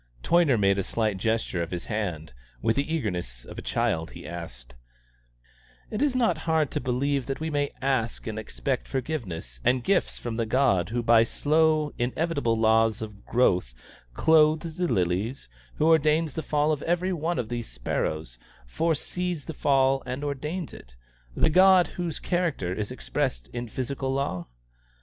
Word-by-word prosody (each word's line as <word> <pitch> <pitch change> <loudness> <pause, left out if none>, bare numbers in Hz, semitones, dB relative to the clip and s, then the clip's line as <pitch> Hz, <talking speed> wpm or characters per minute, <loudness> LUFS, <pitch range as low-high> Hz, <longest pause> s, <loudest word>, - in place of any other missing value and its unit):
Toyner 165 -7 +4
made 100 -1 +3
a - - 0
slight 110 -2 -1
gesture 110 -4 0
of 85 - -3
his 90 -1 -5
hand. 90 - -3 0.3
With 110 - +1
the 140 +4 -1
eagerness 90 - -3
of - - -9
a - - -5
child 80 0 -1
he - - -10
asked: 65 -8 -8 1.2
"Is 265 +4 +1
it - - +2
not 220 -10 +2
hard 160 -3 +2
to - - -1
believe 130 +2 0
that 135 - -3
we 160 0 -3
may 145 -1 0
ask 130 -4 0
and 110 -1 -4
expect 130 +4 -3
forgiveness 95 - -4
and 125 -1 +2
gifts 195 +4 +1
from 115 -2 -5
the 115 -1 -1
God 115 -8 +2
who 120 +1 -1
by 115 -1 +6
slow 155 +4 +2
inevitable 130 -1 0
laws 110 0 +3
of 105 -2 -10
growth 90 - +2 0.4
clothes 160 - +3
the 180 -1 +1
lilies, 95 - -1 0.3
who - - +1
ordains 155 -1 +3
the 160 - -3
fall 150 0 +1
of 150 -2 -1
every 175 +2 0
one 170 +1 -1
of 115 -3 -2
these 120 -1 -4
sparrows, - - -3 0.3
foresees 165 - -2
the 160 - -5
fall 135 -2 +3
and 130 +3 -4
ordains 150 +4 -4
it - - -13 0.4
the 160 - +3
God 185 +1 +7
whose 170 -4 -4
character 165 - -1
is 105 +1 -3
expressed - - -3
in 120 0 -5
physical 130 +3 -3
law? 135 -11 -2
130 Hz, 165 wpm, -26 LUFS, 100-155 Hz, 1.2 s, God